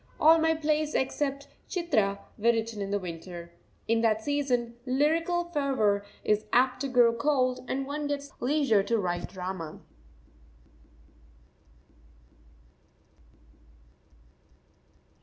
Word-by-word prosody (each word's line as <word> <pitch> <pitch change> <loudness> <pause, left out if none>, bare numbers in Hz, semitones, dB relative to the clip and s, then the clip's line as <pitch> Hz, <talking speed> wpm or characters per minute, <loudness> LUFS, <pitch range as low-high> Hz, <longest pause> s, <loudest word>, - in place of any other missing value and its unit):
All 325 +2 +7
my 320 0 +3
plays 305 -1 0
except 275 +1 -1 0.2
"Chitra" 230 - +1 0.2
were 220 - -9
written 225 -2 -3
in 195 - -3
the 205 - +1
winter. 170 -1 -8 0.3
In 230 0 +2
that 220 -1 +2
season 250 -5 0
lyrical 330 +6 +1
fervour 260 -10 +1 0.2
is 210 0 +1
apt 255 +1 +3
to 280 - -1
grow 245 -3 +4
cold, 255 0 +1
and 270 +1 -1
one 290 +1 -3
gets 285 -1 -3
the - - -14
leisure 275 -7 +3
to 230 +4 0
write 175 -4 -2
drama. 180 -4 -6
255 Hz, 110 wpm, -28 LUFS, 210-290 Hz, 0.3 s, All